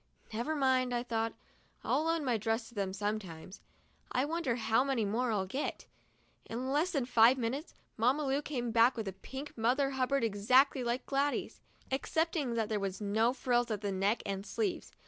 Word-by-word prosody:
"Never 240 +8 -1
mind," 260 -3 +2
I 240 - -1
thought; 225 -2 -1 0.5
"I'll 310 - +1
loan 330 -2 0
my 245 -3 +2
dress 225 +2 -1
to - - -18
them 200 -3 -2
sometimes. 195 -3 -4 0.5
I 255 +2 +1
wonder 315 -5 -1
how 225 +1 +2
many 265 -5 0
more 230 +4 0
I'll 200 -3 0
get." 260 +10 -4 0.6
In 255 +3 -3
less 305 +6 +2
than 280 -8 0
five 240 +1 +6
minutes, 260 +6 -3 0.2
Mamma 255 +7 +2
Lu 275 +1 +1
came 245 -6 -3
back 235 +2 +4
with 220 -3 -3
a 190 - -3
pink 265 +9 -8
Mother 255 +5 +2
Hubbard 265 0 +1
exactly 250 +6 +3
like 240 +1 -1
Gladys's, 280 +1 -1 0.3
excepting 295 -1 0
that 225 -2 0
there 215 -1 -1
were 195 0 -1
no 220 +3 +2
frills 245 -2 +1
at 210 -2 -2
the 205 -2 -2
neck 195 +4 0
and 195 -1 -3
sleeves. 355 - -2
240 Hz, 185 wpm, -32 LUFS, 220-270 Hz, 0.6 s, five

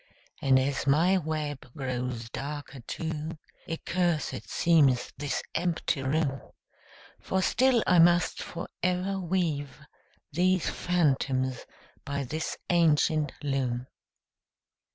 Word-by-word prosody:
And 135 -1 +5
as 135 +1 0
my 170 +7 +4
web 150 -5 -4
grows 125 -3 -3
darker 145 -1 -6
too, 160 0 -4 0.3
Accursed 170 0 -1
seems 145 -7 +3
this 145 0 -2
empty 165 -4 0
room; 135 0 0 0.8
For 190 0 -1
still 250 0 +3
I 180 -1 +5
must 175 +1 +4
forever 180 +2 -2
weave 165 -7 -1 0.5
These 185 +3 +2
phantoms 135 -7 0 0.4
by 140 0 -3
this 155 +5 -3
ancient 155 -3 +3
loom. 130 -3 -1
155 Hz, 95 wpm, -28 LUFS, 135-175 Hz, 0.8 s, And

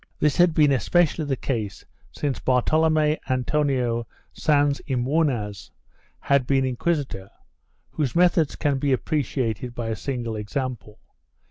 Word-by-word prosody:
This 150 -1 +2
had 175 -2 +4
been 150 -2 +5
espe 140 - +3
cially 155 -1 -2
the 135 - 0
case 110 -6 -4 0.3
since 145 -3 -3
Bartolome 155 +4 +2
Antonio 130 -3 0 0.3
Sans 145 -2 +2
y 130 - +1
Munoz 125 -6 -1 0.5
had 140 -3 +1
been 135 -1 +2
inquisitor, 130 - -2 0.6
whose 150 -3 -2
methods 170 -3 +3
can 145 -3 0
be 140 0 +1
appreciated 125 -5 -2
by 115 -2 -3
a 110 - -1
single 120 -1 -4
example. 110 0 -5
135 Hz, 130 wpm, -24 LUFS, 120-150 Hz, 0.6 s, been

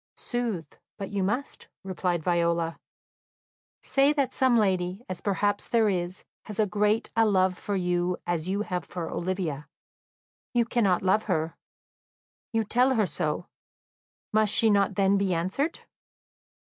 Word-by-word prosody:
"Sooth, 235 -9 -3 0.2
but 195 - -6
you 200 -1 -1
must," 240 +9 -2 0.2
replied 180 -3 -1
Viola. 170 -1 +1 1.0
"Say 275 +1 +3
that 280 -3 0
some 260 -3 +3
lady, 190 0 0
as 185 -2 -5
perhaps 205 0 0
there 225 -3 +3
is, 180 0 -2 0.2
has 210 -1 -6
as 210 -2 +2
great 210 +3 +1
a 225 - +5
love 190 -3 +3
for 200 +2 -3
you 180 -1 0
as 175 -1 -2
you 200 +2 0
have 180 -4 -3
for 175 -2 -5
Olivia; 170 -5 -3 0.9
you 235 -1 +4
cannot 205 -7 +1
love 195 +3 +2
her; 160 -4 -1 1.0
you 225 -1 +1
tell 250 +5 +3
her 215 -3 +3
so; 150 +1 -2 0.9
must 215 -1 +3
she 225 0 +4
not 200 -1 +2
then 195 0 +3
be 190 -3 +1
answered?" 190 - -1
195 Hz, 145 wpm, -27 LUFS, 175-215 Hz, 1.0 s, a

